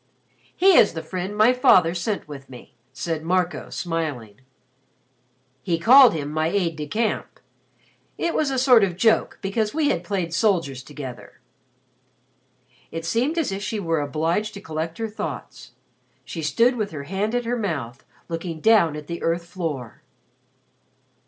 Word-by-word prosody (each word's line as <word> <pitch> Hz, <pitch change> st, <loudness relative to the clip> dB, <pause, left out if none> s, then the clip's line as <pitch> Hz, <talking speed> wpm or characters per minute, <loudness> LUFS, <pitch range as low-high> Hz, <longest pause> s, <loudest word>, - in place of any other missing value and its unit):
"He 385 Hz, 0 st, +5 dB
is 205 Hz, -, +5 dB
the 160 Hz, -1 st, -5 dB
friend 185 Hz, +5 st, -5 dB
my 220 Hz, +4 st, +5 dB
father 180 Hz, -9 st, +5 dB
sent 185 Hz, +2 st, -3 dB
with 140 Hz, -2 st, -10 dB
me," 125 Hz, -2 st, -13 dB, 0.2 s
said 155 Hz, +5 st, -3 dB
Marco 175 Hz, +1 st, -1 dB
smiling. 145 Hz, -, -4 dB, 1.2 s
"He 165 Hz, +5 st, 0 dB
called 245 Hz, +6 st, +7 dB
him 145 Hz, -2 st, -4 dB
my 155 Hz, +1 st, 0 dB
aide 170 Hz, -2 st, 0 dB
de 150 Hz, -1 st, -5 dB
camp. 220 Hz, +5 st, -2 dB, 0.8 s
It 340 Hz, -, -1 dB
was 305 Hz, -3 st, +1 dB
a 265 Hz, -, -1 dB
sort 250 Hz, -4 st, +6 dB
of 180 Hz, -3 st, -1 dB
joke 225 Hz, +3 st, +2 dB
because 210 Hz, +4 st, -1 dB
we 310 Hz, -2 st, +2 dB
had 170 Hz, -, -1 dB
played 175 Hz, -2 st, -3 dB
soldiers 170 Hz, -, +1 dB
together." 130 Hz, -7 st, -9 dB, 1.5 s
It 165 Hz, 0 st, -6 dB
seemed 250 Hz, -, 0 dB
as 320 Hz, -10 st, 0 dB
if 195 Hz, +1 st, -4 dB
she 210 Hz, +1 st, -3 dB
were 165 Hz, -5 st, 0 dB
obliged 165 Hz, +9 st, -1 dB
to -, -, -7 dB
collect 160 Hz, -2 st, -5 dB
her 225 Hz, -, -2 dB
thoughts. 215 Hz, -, -7 dB, 0.5 s
She 165 Hz, -, -6 dB
stood 235 Hz, +11 st, +2 dB
with 210 Hz, -2 st, -2 dB
her 145 Hz, -3 st, -7 dB
hand 195 Hz, +8 st, -2 dB
at 245 Hz, -1 st, -1 dB
her 240 Hz, +1 st, -1 dB
mouth, 150 Hz, -, -4 dB, 0.2 s
looking 165 Hz, -1 st, -5 dB
down 185 Hz, -5 st, +4 dB
at 150 Hz, -1 st, -7 dB
the 170 Hz, +2 st, -6 dB
earth 170 Hz, +1 st, -1 dB
floor. 160 Hz, -, -5 dB
175 Hz, 160 wpm, -23 LUFS, 155-215 Hz, 1.5 s, called